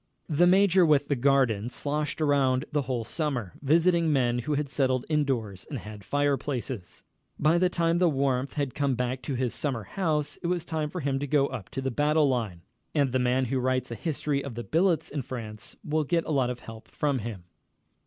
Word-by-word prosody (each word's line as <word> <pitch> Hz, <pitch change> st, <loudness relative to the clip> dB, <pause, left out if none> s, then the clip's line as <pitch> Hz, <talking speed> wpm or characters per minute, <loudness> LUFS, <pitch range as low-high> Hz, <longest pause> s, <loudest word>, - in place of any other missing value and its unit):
The 170 Hz, +3 st, +4 dB
major 190 Hz, 0 st, +5 dB
with 145 Hz, -3 st, +3 dB
the 145 Hz, -, +2 dB
garden 125 Hz, -4 st, +2 dB
sloshed 150 Hz, +4 st, -2 dB
around 140 Hz, -3 st, +2 dB
the 150 Hz, -1 st, +1 dB
whole 125 Hz, -3 st, -2 dB
summer, 125 Hz, -, -2 dB
visiting 165 Hz, +3 st, +3 dB
men 120 Hz, -4 st, +2 dB
who 145 Hz, +5 st, -1 dB
had 145 Hz, 0 st, -1 dB
settled 130 Hz, -2 st, 0 dB
indoors 125 Hz, -, -1 dB
and 145 Hz, -, -4 dB
had 105 Hz, -2 st, -9 dB
fireplaces. 135 Hz, -, -2 dB, 0.3 s
By 160 Hz, +3 st, +3 dB
the 180 Hz, 0 st, +3 dB
time 170 Hz, -1 st, +1 dB
the 180 Hz, -2 st, +4 dB
warmth 135 Hz, -2 st, 0 dB
had 140 Hz, -4 st, -2 dB
come 140 Hz, -3 st, 0 dB
back 125 Hz, +1 st, -2 dB
to 140 Hz, -, -3 dB
his 125 Hz, -1 st, -1 dB
summer 130 Hz, -7 st, -2 dB
house 150 Hz, -, -1 dB
it 170 Hz, -, -2 dB
was 175 Hz, -1 st, -1 dB
time 155 Hz, -3 st, -2 dB
for 180 Hz, +2 st, -5 dB
him 135 Hz, -1 st, 0 dB
to 145 Hz, -, -3 dB
go 140 Hz, 0 st, +3 dB
up 120 Hz, -8 st, -7 dB
to 135 Hz, -, -4 dB
the 135 Hz, -, -1 dB
battle 150 Hz, +3 st, +3 dB
line, 110 Hz, -10 st, -2 dB, 0.3 s
and 140 Hz, -4 st, +2 dB
the 130 Hz, -, +1 dB
man 125 Hz, +1 st, +2 dB
who 130 Hz, +2 st, -1 dB
writes 130 Hz, -1 st, 0 dB
a -, -, -3 dB
history 145 Hz, -1 st, -2 dB
of 140 Hz, -5 st, -6 dB
the 120 Hz, -, -4 dB
billets 170 Hz, +3 st, +2 dB
in 145 Hz, -, -2 dB
France 115 Hz, -3 st, -7 dB
will 155 Hz, 0 st, 0 dB
get 165 Hz, +3 st, 0 dB
a -, -, -3 dB
lot 135 Hz, -4 st, +2 dB
of 125 Hz, -1 st, -5 dB
help 115 Hz, 0 st, -11 dB
from 145 Hz, -3 st, -1 dB
him. 105 Hz, -5 st, -6 dB
140 Hz, 210 wpm, -27 LUFS, 125-150 Hz, 0.3 s, major